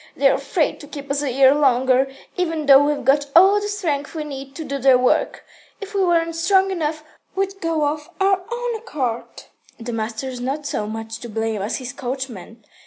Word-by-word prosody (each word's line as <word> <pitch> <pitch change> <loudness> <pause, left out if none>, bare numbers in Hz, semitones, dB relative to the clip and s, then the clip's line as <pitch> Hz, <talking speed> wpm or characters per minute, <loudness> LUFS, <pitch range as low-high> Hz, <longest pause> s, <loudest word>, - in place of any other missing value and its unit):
They're 275 0 +4
afraid - - -1
to 290 - -11
keep 285 -1 -7
us 280 0 0
a 285 -3 -1
year 265 +1 +6
longer, 265 -2 +3 0.3
even 325 -4 -1
though 275 0 +8
we've 295 0 -1
got 285 +1 +3
all 390 +4 +7
the 415 - -3
strength 330 -8 -2
we 310 - -3
need 275 -2 -8
to 325 - -5
do 280 -2 -4
their 265 -1 +5
work. 250 0 +1 0.3
If 405 +1 -8
we 395 -1 +2
weren't 335 -2 +1
strong 380 +3 +3
enough, 310 -3 -2 0.3
we'd 390 0 -2
go 325 -2 0
of 300 +2 -4
our 385 0 +3
own 480 0 -2
accord." 280 - -4 0.4
"The 235 +1 -5
master's 230 +3 -4
not 280 +4 -3
so 210 -7 -2
much 225 +1 -6
to 240 - -8
blame 220 -1 -2
as 205 - -2
his 250 -2 -6
coachman. 245 -4 -6
285 Hz, 195 wpm, -21 LUFS, 255-330 Hz, 0.4 s, though